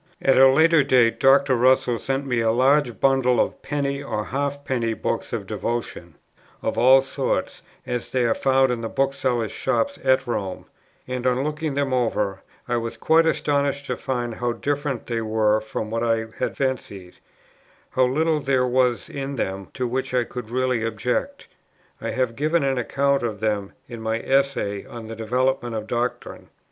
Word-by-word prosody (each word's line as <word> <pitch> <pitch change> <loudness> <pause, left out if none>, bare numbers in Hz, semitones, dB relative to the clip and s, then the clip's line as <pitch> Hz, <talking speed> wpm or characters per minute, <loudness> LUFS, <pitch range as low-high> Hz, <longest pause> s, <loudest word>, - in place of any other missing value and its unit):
At 135 - +3
a 135 0 +8
later 160 +3 +5
date 125 -4 +3
Dr. 135 0 +5
Russell 125 -1 +3
sent 135 +1 -2
me 125 -3 0
a 115 -1 +2
large 130 +1 +2
bundle 135 -2 +3
of - - 0
penny 140 -1 -2
or 110 -6 -3
half 140 +1 -3
penny 115 -3 -1
books - - -3
of - - -3
devotion, 100 -8 -4 0.5
of - - -1
all 130 +2 +6
sorts, 135 - -2 0.2
as 125 -1 -3
they 125 -2 +1
are 115 - +3
found 135 -1 +2
in 120 -2 -2
the 115 - -4
booksellers' 130 -4 0
shops 280 0 -1
at 130 0 +3
Rome; 100 -6 -4 0.4
and, 125 0 -2
on 130 +1 +1
looking 150 -1 -3
them 140 -2 0
over, 105 -6 0 0.3
I 120 -1 0
was 115 0 -4
quite 165 +1 +3
astonished 140 -2 0
to 125 - -2
find 120 -2 -3
how 120 +1 -2
different 145 -2 -2
they 115 -1 -2
were 110 -1 +1
from 110 0 -5
what 115 0 -1
I 115 -1 +1
had - - -2
fancied, 105 -9 -3 0.7
how 130 - +3
little 155 +4 +1
there 135 -2 +1
was 125 -1 +1
in 140 0 -5
them 95 -5 -3
to 130 - -1
which 130 +1 -2
I 125 - +3
could 120 -2 -8
really 125 -1 0
object. 125 - -2 0.6
I - - -3
have 130 -3 -1
given 155 +3 +1
an 135 -2 +1
account 140 +3 +1
of 110 -3 -3
them 105 -3 -1
in 120 -2 -8
my 110 0 -1
Essay 135 -7 0
on 115 -2 -9
the 115 +1 -7
Development 120 +2 -1
of 110 -1 -3
Doctrine. 120 +2 -4
125 Hz, 175 wpm, -23 LUFS, 115-135 Hz, 0.7 s, a